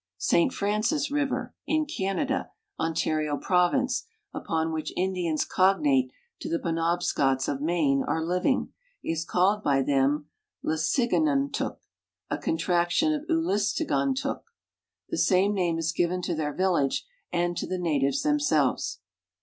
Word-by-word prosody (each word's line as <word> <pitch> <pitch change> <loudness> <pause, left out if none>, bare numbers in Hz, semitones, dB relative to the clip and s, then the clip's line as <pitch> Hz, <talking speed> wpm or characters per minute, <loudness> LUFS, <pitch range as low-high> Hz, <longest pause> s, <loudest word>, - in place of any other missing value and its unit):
St 305 -6 +2
Francis 225 +7 0
river, 290 -2 -1
in 310 0 +1
Canada, 270 0 -2 0.3
Ontario 155 -2 0
province, 185 - +1 0.3
upon 160 0 -2
which 155 -1 -3
Indians 180 -4 0
cognate 150 -9 +3 0.3
to - - -5
the 165 - +1
Penobscots 165 -6 0
of 140 -1 -2
Maine 150 -4 +2
are 160 0 0
living, 180 - 0 0.3
is 165 0 -1
called 190 +5 +2
by 135 -2 +2
them 140 +2 +1 0.4
Lesigantuk, 275 - +1 0.5
a - - -1
contraction 175 - +1
of 305 +1 -4
Ulastigan 275 - +1
tuk. 270 - -3 0.7
The - - -2
same 195 +2 +3
name 175 -4 0
is 165 0 0
given 180 +2 0
to 175 - -1
their 155 -2 -2
village 180 -8 +1 0.3
and 175 0 0
to - - -3
the 185 - -2
natives 145 -6 0
themselves. 275 - +1
175 Hz, 125 wpm, -27 LUFS, 155-220 Hz, 0.7 s, cognate